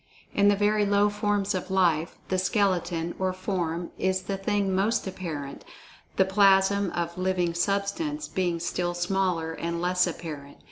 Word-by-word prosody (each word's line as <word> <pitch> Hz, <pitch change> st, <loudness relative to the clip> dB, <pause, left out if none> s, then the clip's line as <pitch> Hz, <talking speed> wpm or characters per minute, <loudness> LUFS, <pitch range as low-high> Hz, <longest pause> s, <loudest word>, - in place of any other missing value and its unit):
In 200 Hz, 0 st, +4 dB
the 205 Hz, -, +5 dB
very 210 Hz, +1 st, +2 dB
low 205 Hz, 0 st, +3 dB
forms 205 Hz, -1 st, 0 dB
of 185 Hz, 0 st, -4 dB
life, 175 Hz, -4 st, +1 dB
the 185 Hz, -, +1 dB
skeleton, 180 Hz, -4 st, 0 dB
or 185 Hz, -1 st, 0 dB
form, 175 Hz, -3 st, -3 dB
is 185 Hz, 0 st, 0 dB
the 195 Hz, -, -3 dB
thing 195 Hz, 0 st, 0 dB
most 200 Hz, +5 st, +1 dB
apparent, 160 Hz, -7 st, -6 dB, 0.5 s
the 190 Hz, -, +4 dB
plasm 195 Hz, 0 st, +4 dB
of 170 Hz, +1 st, -3 dB
"living 185 Hz, -2 st, 0 dB
substance" 200 Hz, -, -1 dB
being 175 Hz, -3 st, -1 dB
still 175 Hz, +1 st, -2 dB
smaller, 175 Hz, -2 st, 0 dB
and 170 Hz, +1 st, -3 dB
less 180 Hz, +1 st, +2 dB
apparent. 150 Hz, -5 st, -7 dB
185 Hz, 150 wpm, -27 LUFS, 175-200 Hz, 0.5 s, the